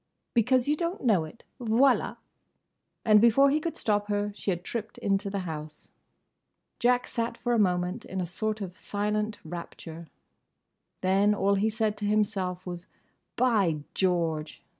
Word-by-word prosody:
"Because 250 +2 +3
you 295 - +3
don't 340 +2 -3
know 200 -10 +3
it!—Voilà!" 235 - +1 0.9
And 215 -2 +6
before 275 +5 +6
he 300 - +2
could 330 +1 -4
stop 205 -1 +1
her 205 0 -1
she 205 - -4
had 175 -2 -1
tripped 220 0 -5
into 200 0 0
the 195 0 -2
house. 155 -3 -7 0.9
Jack 245 +1 +3
sat 235 0 -3
for 240 - -1
a 235 - +3
moment 180 -2 +1
in 190 - -5
a 180 - -1
sort 215 +5 -3
of 185 -2 -5
silent 210 +1 -1
rapture. 165 0 -8 0.9
Then 195 +3 +3
all 200 0 +2
he 200 +2 +2
said 220 -1 -1
to 210 - -3
himself 200 -4 0
was 175 -1 -6 0.5
"By 200 -12 +2
George!" 165 -4 -1
205 Hz, 150 wpm, -28 LUFS, 180-230 Hz, 0.9 s, And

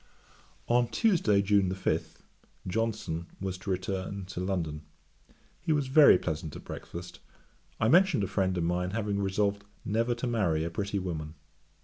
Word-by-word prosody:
On 120 0 +3
Tuesday, 120 - +2
June 100 -2 +3
5, 95 - -2 0.4
Johnson 95 -5 -2
was 95 -1 -3
to 100 - -7
return 95 +1 -3
to 95 -1 -7
London. 85 -5 -2 0.8
He 170 - -2
was 145 -3 +1
very 140 -7 +8
pleasant 80 -3 -4
at - - -9
breakfast; 85 +1 -8 0.6
I 110 - +2
mentioned 180 - +5
a - - 0
friend 95 -2 0
of 85 - 0
mine 90 +2 0
having 105 -2 -1
resolved 100 +1 0 0.2
never 115 +3 +1
to 120 - -4
marry 100 -10 +1
a 85 - -3
pretty 100 +3 -2
woman. 80 -4 -4
100 Hz, 150 wpm, -29 LUFS, 90-115 Hz, 0.8 s, very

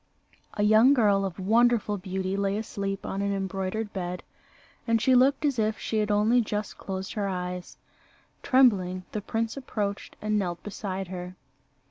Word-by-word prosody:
A 205 - 0
young 220 +6 +6
girl 200 -5 +3
of 185 -3 -5
wonderful 220 +2 +3
beauty 190 0 -3
lay 200 0 0
asleep 200 -3 -4
on 195 - -3
an 200 0 0
embroidered 195 +2 -3
bed, 180 -2 -4 0.6
and 230 0 +3
she 260 - +3
looked 265 +4 +4
as 275 -5 +1
if 215 0 +1
she 220 - -2
had 210 0 0
only 215 +4 +4
just 210 -1 -3
closed 190 -1 -5
her 205 -3 -1
eyes. 180 -1 -5 0.6
Trembling, 190 -9 +3
the 210 - -3
prince 225 +2 -2
approached 210 -7 -4
and 215 0 0
knelt 175 -3 -3
beside 195 -2 -5
her. 180 0 -6
205 Hz, 160 wpm, -27 LUFS, 190-220 Hz, 0.6 s, young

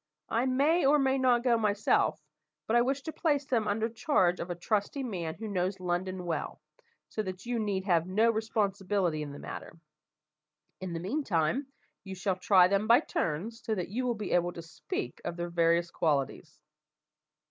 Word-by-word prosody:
I 235 +3 +1
may 285 +7 +3
or 285 +2 +5
may 270 -1 +2
not 245 -2 +3
go 240 -3 +3
myself, 210 -1 +2 0.5
but 225 - 0
I 240 - +6
wish 270 +3 0
to 315 - -5
place 290 -4 +1
them 230 -5 0
under 215 +2 +1
charge 220 - +1
of 175 - -5
a 175 - -2
trusty 210 +9 -1
man 175 -9 -4
who 220 +5 -6
knows 190 -1 -1
London 180 +1 -2
well, 165 -3 -3 0.5
so 215 - -2
that 185 0 -6
you 240 -1 -1
need 200 -3 -1
have 170 -3 +2
no 220 +5 +3
responsibility 200 -6 0
in 145 -1 -5
the 140 - -8
matter. 160 - -8 1.0
In 185 -2 -5
the 165 - -3
meantime, 210 - 0 0.4
you 190 -1 -7
shall 185 0 -1
try 185 -1 +5
them 200 +3 +1
by 235 +5 +6
turns, 215 - -3
so 220 - -1
that 180 -3 -3
you 250 +5 -2
will 240 - 0
be 210 -2 -5
able 175 0 +2
to 170 - -7
speak 155 -6 -5
of 170 0 -4
their 175 0 -3
various 170 0 +2
qualities." 150 0 -1
200 Hz, 185 wpm, -30 LUFS, 175-235 Hz, 1.0 s, I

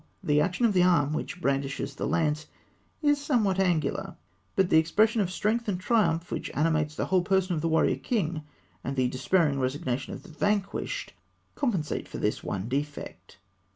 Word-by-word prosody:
The 150 0 +3
action 180 +8 +1
of 220 - +3
the 180 - +4
arm 165 -5 +3
which 165 - -4
brandishes 140 -2 -1
the - - -3
lance 155 -2 0 0.6
is 290 -1 +3
somewhat 220 -10 +1
angular, 170 -6 0 0.4
but 190 -2 +2
the 160 - +7
expression 215 +8 +3
of 185 - 0
strength 215 +5 -1
and 190 -3 -1
triumph 180 -5 +1
which - - -3
animates 155 -1 +1
the - - -1
whole 185 -1 +3
person 185 0 +1
of 155 - -1
the 165 - 0
warrior 160 0 +3
king, 175 -9 -1 0.4
and 135 - -3
the 130 -2 +2
despairing 140 +2 +1
resignation 130 0 -2
of - - -8
the 200 - -14
vanquished, 200 +4 -1 0.4
compensate 200 - -1
for - - -7
this - - -1
one 95 +2 -3
defect. 140 -9 -5
165 Hz, 175 wpm, -28 LUFS, 150-195 Hz, 0.6 s, the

